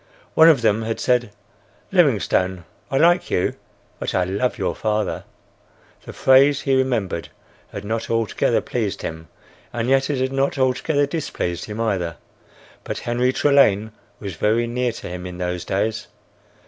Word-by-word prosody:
One 160 +1 +7
of 140 -7 +4
them 110 0 +3
had 110 0 -3
said, 125 -2 +1 0.6
"Livingstone, 90 -2 +2 0.2
I 135 - 0
like 175 +4 +4
you, 90 - 0 0.5
but - - -3
I 95 - +3
love 100 +8 -1
your 95 - -1
father." 105 -2 -2 0.8
The - - -7
phrase, 135 +2 +4
he 135 - 0
remembered, 120 -10 -1 0.4
had 100 - -7
not 115 +2 -3
altogether 115 -2 +1
pleased - - -3
him, 80 0 -6 0.4
and 120 0 -2
yet 135 +1 +3
it 145 - 0
had 130 +1 -1
not 135 +1 0
altogether 140 +3 +1
displeased 140 - -3
him 105 +1 -7
either. 95 -7 -1 0.7
But - - -4
Henry 125 +2 0
Trelane 110 -7 +3 0.3
was 100 -3 -5
very 110 +7 +1
near 125 +1 -1
to 115 - -8
him 90 0 -6
in 90 -1 -8
those 90 -1 -3
days. 105 +3 -1
115 Hz, 155 wpm, -21 LUFS, 95-130 Hz, 0.8 s, One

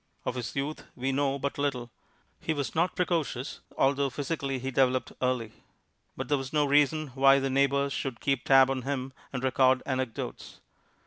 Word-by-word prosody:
Of - - -1
his 125 -2 -5
youth 140 +3 -3
we 130 +1 -1
know 140 0 +1
but 140 +1 -3
little. 125 -4 -2 0.5
He 160 - -2
was 140 -2 -3
not 170 +3 +1
precocious, 160 -7 -1 0.2
although 140 +1 +2
physically 140 0 -3
he 130 +1 -4
developed 130 -1 +2
early; 125 -4 0 0.7
but - - -4
there 145 -1 +2
was 135 0 -6
no 150 -1 +2
reason 145 +1 +3
why 135 +1 +5
the 135 -1 -1
neighbors 140 +1 +2
should 130 -4 -3
keep 135 -2 0
tab 135 -1 +6
on 130 -1 -2
him 135 0 -3 0.2
and 130 -1 -4
record 130 0 +3
anecdotes. 130 -3 -4
135 Hz, 175 wpm, -28 LUFS, 130-140 Hz, 0.7 s, tab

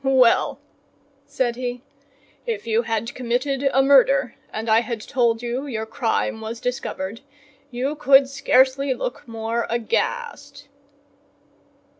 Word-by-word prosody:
"Well," 260 -3 +3 0.7
said 240 -2 -1
he, 245 0 -4 0.6
"if 460 - -3
you 225 0 +2
had 230 -1 -3
committed 255 +3 -1
a 270 +1 +3
murder, 270 -2 +4 0.2
and 220 +1 -5
I 220 +1 +4
had 235 -2 -4
told 235 -1 0
you 245 +4 -3
your 220 -4 -3
crime 220 0 -1
was 225 +1 -6
discovered, 230 -4 -4 0.5
you 260 +3 -2
could 275 -2 +5
scarcely 265 0 +2
look - - -5
more 230 +1 -3
aghast." 285 - -3
245 Hz, 120 wpm, -22 LUFS, 230-270 Hz, 0.7 s, could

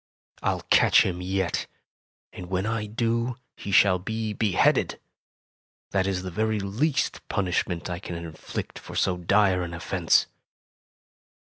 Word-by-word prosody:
I'll - - -1
catch - - +6
him 90 -1 -2
yet, 95 -1 -1 0.7
and 90 - -8
when 95 +1 -1
I 110 -1 -2
do 115 +2 -1 0.2
he 100 - -6
shall 95 -1 +5
be 110 +2 -3
beheaded. 105 -4 +2 0.9
That 95 -1 +1
is 95 -2 -1
the 95 - -5
very 110 +3 0
least 110 +10 0
punishment 90 -2 -1
I 90 -1 -4
can 90 -2 -6
inflict 85 -2 -6
for - - -10
so 90 - +2
dire 95 +1 +3
an 85 -1 -4
offense." 85 0 +2
95 Hz, 135 wpm, -26 LUFS, 90-110 Hz, 0.9 s, catch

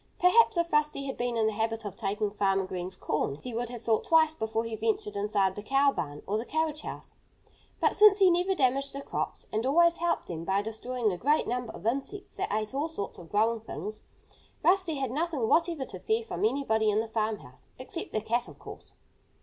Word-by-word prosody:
Perhaps 360 +2 +5
if 340 -1 0
Rusty 300 -2 +1
had 270 - -4
been 240 -1 -2
in 220 - +2
the 220 - +1
habit 225 +1 -2
of 200 -2 -5
taking 205 +1 -2
Farmer 195 -2 +1
Green's 185 0 -5
corn 150 -5 -1
he 245 - -8
would 235 +1 -2
have 240 -1 -8
thought 220 -2 +2
twice 320 -1 +4
before 220 -4 -2
he 230 -1 -4
ventured 220 -1 -1
inside 200 -2 +1
the 205 - -7
cow 275 +5 +3
barn 145 - -5
or 210 +2 -1
the - - -3
carriage 315 0 -1
house. - - -8 0.6
But - - +3
since 420 -1 +7
he 380 -3 +6
never 360 +3 +2
damaged 275 -1 +1
the 275 0 -6
crops, - - -4
and 215 +1 0
always 335 +6 +4
helped 345 0 0
them 165 -2 -6
by 195 +3 0
destroying 225 +1 -2
a 180 - -5
great 295 +4 +2
number 245 -1 -3
of 190 - -11
insects 275 - -3
that - - -2
ate 215 +3 -2
all 285 +4 0
sorts 315 -12 -5
of 170 -2 -12
growing 225 +2 +2
things, 215 -1 -6 0.6
Rusty 370 -3 +3
had 270 -4 -2
nothing 300 -4 -1
whatever 330 -2 +2
to - - -9
fear 445 +1 0
from 425 - -2
anybody 220 - +1
in 210 0 +2
the 225 - -2
farmhouse 215 - -4
except 260 +6 -6
the 215 - -1
cat, 235 +3 -1
of - - -13
course. - - -11
235 Hz, 215 wpm, -29 LUFS, 210-305 Hz, 0.6 s, since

